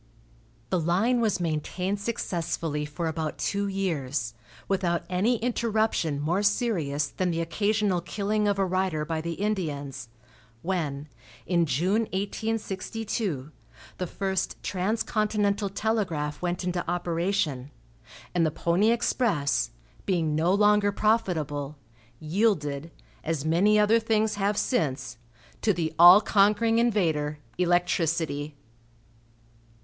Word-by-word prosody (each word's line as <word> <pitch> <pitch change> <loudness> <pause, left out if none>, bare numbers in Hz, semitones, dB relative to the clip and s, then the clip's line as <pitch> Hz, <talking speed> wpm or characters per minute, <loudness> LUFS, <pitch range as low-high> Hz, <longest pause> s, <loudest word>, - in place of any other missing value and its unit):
The 185 - +2
line 195 +10 +2
was 215 -5 +1
maintained 180 +4 -2
successfully 165 -8 -2
for 150 +3 -4
about 160 -1 -3
two 200 0 -1
years, 145 - -2 0.3
without 180 -3 0
any 205 +7 +2
interruption 220 -9 0
more 170 +7 0
serious 175 - 0
than 185 -1 -1
the 165 -1 -1
occasional 200 +2 0
killing 210 +4 -1
of 200 -1 +1
a 195 - +2
rider 185 -4 0
by 160 0 -2
the 170 +1 -3
Indians, 145 - -3 0.5
when, 155 -6 -2 0.4
in 170 -2 +2
June, 185 - +1
1862, 200 - -3 0.5
the 180 - -2
first 190 0 -2
transcontinental 205 +1 0
telegraph 195 -8 -1
went 175 0 -2
into 180 -1 -1
operation, 170 -6 -1 0.6
and 175 -2 +2
the 160 - +3
pony 170 +7 +1
express, 225 - +1 0.4
being 165 -5 +1
no 160 +4 +2
longer 205 0 +4
profitable, 155 -10 0 0.4
yielded, 155 -4 0 0.3
as 155 -2 -2
many 190 +7 +4
other 210 +2 +4
things 220 -1 +1
have 205 +1 0
since, 130 - -1 0.4
to 215 - +3
the 160 -2 -2
all 175 +4 +10
conquering 215 +2 +3
invader, 160 -11 +1 0.2
electricity. 165 -4 0
180 Hz, 115 wpm, -27 LUFS, 155-210 Hz, 0.6 s, all